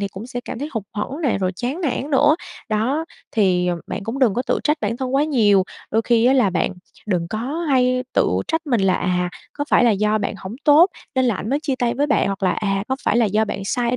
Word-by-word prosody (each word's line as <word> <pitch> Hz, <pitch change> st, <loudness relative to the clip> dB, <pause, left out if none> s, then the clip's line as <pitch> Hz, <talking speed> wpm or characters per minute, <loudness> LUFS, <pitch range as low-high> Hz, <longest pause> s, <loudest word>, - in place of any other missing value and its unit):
thì 200 Hz, -, -1 dB
cũng 195 Hz, +4 st, -9 dB
sẽ 245 Hz, -1 st, -5 dB
cảm -, -, -6 dB
thấy 290 Hz, +4 st, -4 dB
hụt 220 Hz, -4 st, -3 dB
hẫng 260 Hz, +9 st, -4 dB
nè, 270 Hz, -, +1 dB
rồi 185 Hz, -1 st, -1 dB
chán 260 Hz, +9 st, -3 dB
nản 290 Hz, -2 st, -2 dB
nữa. 290 Hz, +3 st, +4 dB, 0.3 s
Đó, 245 Hz, +9 st, 0 dB, 0.3 s
thì, 185 Hz, -4 st, +2 dB
ừm, 175 Hz, -1 st, -1 dB
bạn 200 Hz, -, -5 dB
cũng 230 Hz, +5 st, -4 dB
đừng 235 Hz, -7 st, +3 dB
có 245 Hz, -, 0 dB
tự -, -, +1 dB
trách 300 Hz, +1 st, +2 dB
bản 220 Hz, +2 st, -1 dB
thân 260 Hz, +1 st, -3 dB
quá 285 Hz, +2 st, +3 dB
nhiều, 210 Hz, -10 st, +3 dB, 0.3 s
đôi 225 Hz, +1 st, +2 dB
khi 235 Hz, 0 st, +2 dB
á 255 Hz, -, +5 dB
là 250 Hz, -7 st, +3 dB
bạn 180 Hz, +1 st, 0 dB, 0.3 s
đừng 175 Hz, -4 st, -1 dB
có 215 Hz, -, -3 dB, 0.3 s
hay 255 Hz, -1 st, +2 dB
tự -, -, +3 dB, 0.2 s
trách 320 Hz, 0 st, -1 dB
mình 240 Hz, -7 st, +1 dB
là, 190 Hz, -1 st, +3 dB
à, 180 Hz, 0 st, 0 dB, 0.2 s
có 290 Hz, -, -3 dB
phải -, -, +5 dB
là 235 Hz, -, +5 dB
do 210 Hz, +1 st, +1 dB
bạn 205 Hz, 0 st, -2 dB
hổng 190 Hz, +5 st, -7 dB
tốt 315 Hz, +5 st, +6 dB, 0.2 s
nên 260 Hz, -1 st, +2 dB
là 235 Hz, -4 st, +2 dB
ảnh 210 Hz, -, -5 dB
mới 280 Hz, -, +2 dB
chia 275 Hz, -3 st, -1 dB
tay 240 Hz, -1 st, 0 dB
với 285 Hz, +4 st, +1 dB
bạn, 285 Hz, -, +2 dB
hoặc 195 Hz, 0 st, -3 dB
là, 185 Hz, -, +3 dB
à, 195 Hz, -2 st, -1 dB
có 265 Hz, -, 0 dB
phải -, -, +2 dB
là 235 Hz, -, +4 dB
do 210 Hz, +2 st, +1 dB
bạn 195 Hz, -2 st, -5 dB
sai 240 Hz, +4 st, 0 dB
ở 250 Hz, -, 0 dB
235 Hz, 270 wpm, -21 LUFS, 200-265 Hz, 0.3 s, tốt